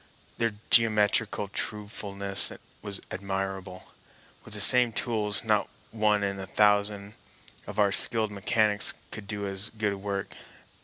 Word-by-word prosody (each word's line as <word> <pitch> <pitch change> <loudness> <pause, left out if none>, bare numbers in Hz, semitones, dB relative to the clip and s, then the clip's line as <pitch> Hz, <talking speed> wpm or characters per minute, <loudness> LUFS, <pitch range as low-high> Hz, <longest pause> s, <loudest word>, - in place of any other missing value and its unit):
Their 115 -2 0 0.2
geometrical 105 -2 +2
truthfulness 100 -1 +1 0.3
was 100 -2 -7
admirable. 95 -1 -5 0.6
With 105 - -8
the - - -3
same 125 +2 +6
tools 105 -4 -1
not - - 0 0.2
one 105 -2 0
in 100 -1 -3
a 95 - -7
thousand 105 0 0 0.5
of - - -9
our 100 -2 +2
skilled 110 +1 +5
mechanics 105 +1 +1 0.2
could 105 -2 -8
do 100 -1 -4
as 100 +2 -2
good 105 -2 -3
work. 100 0 -5
105 Hz, 125 wpm, -26 LUFS, 100-105 Hz, 0.6 s, same